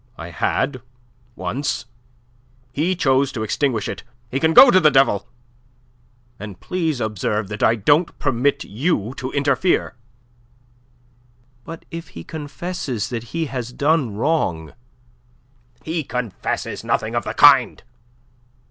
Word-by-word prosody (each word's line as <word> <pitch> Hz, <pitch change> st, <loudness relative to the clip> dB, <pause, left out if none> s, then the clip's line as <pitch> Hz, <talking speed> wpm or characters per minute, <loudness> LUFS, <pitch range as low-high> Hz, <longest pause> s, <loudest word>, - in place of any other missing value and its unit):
I 85 Hz, +1 st, -8 dB
had 130 Hz, -, -1 dB, 0.5 s
once. 140 Hz, 0 st, -3 dB, 0.9 s
He 165 Hz, +7 st, 0 dB
chose 135 Hz, -4 st, +2 dB
to 110 Hz, -, -3 dB
extinguish 115 Hz, 0 st, -1 dB
it. -, -, -5 dB, 0.3 s
He 135 Hz, -, -1 dB
can 160 Hz, +2 st, +2 dB
go 260 Hz, -, +10 dB
to 185 Hz, -, +6 dB
the 155 Hz, -4 st, +5 dB
devil; 135 Hz, -7 st, +2 dB, 1.1 s
and 100 Hz, -3 st, -8 dB
please 165 Hz, -7 st, -2 dB
observe 105 Hz, -2 st, -2 dB
that 105 Hz, 0 st, -6 dB
I 115 Hz, -, +4 dB
don't 145 Hz, -, +2 dB
permit 140 Hz, 0 st, 0 dB
you 120 Hz, -, -1 dB
to 130 Hz, -2 st, -4 dB
interfere." 145 Hz, +5 st, +1 dB, 1.7 s
"But 165 Hz, 0 st, -9 dB
if 165 Hz, 0 st, -7 dB
he 85 Hz, -, -7 dB
confesses 145 Hz, -, -5 dB
that 120 Hz, -2 st, -5 dB
he 165 Hz, +6 st, -3 dB
has 125 Hz, -4 st, -5 dB
done 145 Hz, -7 st, +1 dB
wrong..." 105 Hz, -, -1 dB, 1.1 s
"He 160 Hz, 0 st, -2 dB
confesses 125 Hz, -6 st, -4 dB
nothing -, -, -1 dB
of -, -, 0 dB
the -, -, -5 dB
kind. -, -, +6 dB
135 Hz, 125 wpm, -21 LUFS, 110-160 Hz, 1.7 s, go